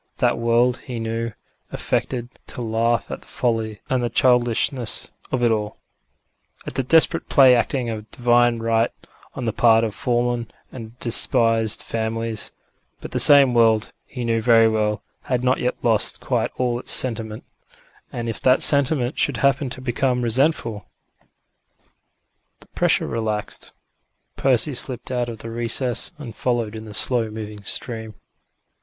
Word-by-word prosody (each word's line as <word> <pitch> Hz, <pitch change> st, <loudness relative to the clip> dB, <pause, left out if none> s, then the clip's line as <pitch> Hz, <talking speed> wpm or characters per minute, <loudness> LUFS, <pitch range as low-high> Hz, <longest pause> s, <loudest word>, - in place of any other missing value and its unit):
That -, -, 0 dB
world, 120 Hz, +1 st, +1 dB
he 125 Hz, -3 st, -7 dB
knew, 115 Hz, +1 st, -3 dB, 0.4 s
affected 120 Hz, -2 st, -3 dB, 0.2 s
to 125 Hz, -, -7 dB
laugh 115 Hz, +1 st, -1 dB
at -, -, -6 dB
the -, -, -18 dB
folly 110 Hz, -3 st, -2 dB
and 130 Hz, -1 st, -1 dB
the 120 Hz, -, -1 dB
childishness 120 Hz, 0 st, +1 dB, 0.2 s
of 130 Hz, -2 st, -1 dB
it 120 Hz, -, +3 dB
all 105 Hz, -1 st, -3 dB, 0.9 s
at -, -, -7 dB
the 135 Hz, -, -1 dB
desperate 165 Hz, +5 st, +2 dB
play 135 Hz, -3 st, +6 dB
acting 125 Hz, +1 st, -1 dB
of 110 Hz, -1 st, -8 dB
Divine 120 Hz, -1 st, +2 dB
Right 115 Hz, 0 st, 0 dB, 0.5 s
on 130 Hz, -, -5 dB
the 115 Hz, -, -2 dB
part 115 Hz, -1 st, +4 dB
of 110 Hz, -2 st, -2 dB
fallen 120 Hz, -1 st, -2 dB, 0.2 s
and 115 Hz, -1 st, -11 dB
despised 115 Hz, -2 st, +3 dB
families; 115 Hz, 0 st, -3 dB, 0.5 s
but -, -, -10 dB
the -, -, -2 dB
same 140 Hz, -3 st, +8 dB
world, 115 Hz, -2 st, +2 dB
he 125 Hz, -2 st, -6 dB
knew 115 Hz, -1 st, 0 dB
very 115 Hz, -1 st, +5 dB
well, 105 Hz, -1 st, -1 dB, 0.2 s
had 125 Hz, -1 st, -2 dB
not 130 Hz, +1 st, +1 dB
yet 125 Hz, -, -1 dB
lost 115 Hz, -3 st, +1 dB
quite -, -, -1 dB
all 120 Hz, -1 st, -1 dB
its -, -, -1 dB
sentiment; 110 Hz, -3 st, +1 dB, 0.7 s
and 120 Hz, -1 st, -5 dB
if 115 Hz, -, -4 dB
that 130 Hz, 0 st, +3 dB
sentiment 140 Hz, -2 st, +4 dB
should 140 Hz, -5 st, 0 dB
happen 140 Hz, +2 st, +1 dB
to 130 Hz, +1 st, -6 dB
become 125 Hz, 0 st, -1 dB
resentful 115 Hz, -, 0 dB, 1.7 s
The -, -, -18 dB
pressure -, -, +1 dB
relaxed; 110 Hz, -2 st, -4 dB, 0.6 s
Percy 135 Hz, +2 st, +1 dB
slipped 125 Hz, 0 st, -3 dB
out 120 Hz, -1 st, -2 dB
of 115 Hz, -, -7 dB
the 115 Hz, +2 st, -8 dB
recess, 120 Hz, +1 st, 0 dB
and 130 Hz, -7 st, -9 dB
followed 120 Hz, -4 st, -2 dB
in 110 Hz, 0 st, -8 dB
the 105 Hz, -1 st, -8 dB
slow 120 Hz, -2 st, +1 dB
moving 105 Hz, -1 st, -8 dB
stream. 110 Hz, 0 st, -4 dB
120 Hz, 150 wpm, -21 LUFS, 115-125 Hz, 1.7 s, same